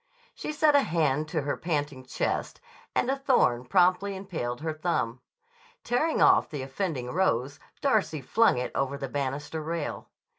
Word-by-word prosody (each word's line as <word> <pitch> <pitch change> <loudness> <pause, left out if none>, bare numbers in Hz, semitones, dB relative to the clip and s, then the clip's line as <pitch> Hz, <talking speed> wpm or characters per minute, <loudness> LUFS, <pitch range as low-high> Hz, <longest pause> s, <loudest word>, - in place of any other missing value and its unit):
She - - -5
set 300 -1 +3
a 285 - +6
hand 155 - +1
to 155 -1 -2
her 145 - -1
panting 145 -5 -2
chest - - -2 0.4
and - - +2
a - - +1
thorn 245 - +2
promptly 185 +6 +3
impaled 160 -11 -4
her 160 0 -2
thumb. 155 -7 -1 0.6
Tearing 305 +7 +2
off - - +5
the 145 -4 -5
offending 135 -3 -3
rose 140 -7 0 0.2
Darcy 215 - +1
flung 225 - +3
it 125 - -2
over 135 +1 -1
the 135 - -4
banister 145 +3 -3
rail. 150 -10 -4
155 Hz, 155 wpm, -28 LUFS, 135-190 Hz, 0.6 s, a